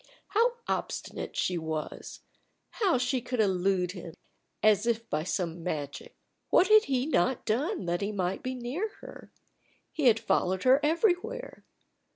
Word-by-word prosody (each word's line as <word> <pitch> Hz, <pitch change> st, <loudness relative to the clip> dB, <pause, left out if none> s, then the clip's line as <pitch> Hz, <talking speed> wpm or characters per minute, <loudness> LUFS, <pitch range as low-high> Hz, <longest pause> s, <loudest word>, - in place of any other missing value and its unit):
How 470 Hz, +3 st, +3 dB
obstinate -, -, -4 dB
she 180 Hz, -2 st, 0 dB
was! 160 Hz, -1 st, -5 dB, 0.5 s
How 390 Hz, -, +2 dB
she 250 Hz, +1 st, 0 dB
could 250 Hz, 0 st, -4 dB
elude 185 Hz, -2 st, +2 dB
him, 175 Hz, -3 st, -9 dB, 0.5 s
as 215 Hz, +1 st, +4 dB
if 230 Hz, -1 st, 0 dB
by 150 Hz, -, +1 dB
some 175 Hz, -1 st, -2 dB
magic! 145 Hz, -4 st, -5 dB, 0.3 s
What 370 Hz, -, +4 dB
had 430 Hz, 0 st, +7 dB
he 260 Hz, -1 st, 0 dB
not 260 Hz, -, +1 dB
done 285 Hz, -, -1 dB
that 175 Hz, +2 st, -1 dB
he 200 Hz, +1 st, -1 dB
might 190 Hz, -2 st, -2 dB
be 255 Hz, 0 st, -3 dB
near 260 Hz, -, -3 dB
her? -, -, -12 dB, 0.6 s
He 300 Hz, -, -2 dB
had 225 Hz, -2 st, +5 dB
followed 185 Hz, -3 st, 0 dB
her 260 Hz, +2 st, +6 dB
everywhere. 395 Hz, +9 st, 0 dB
230 Hz, 150 wpm, -29 LUFS, 180-300 Hz, 0.6 s, had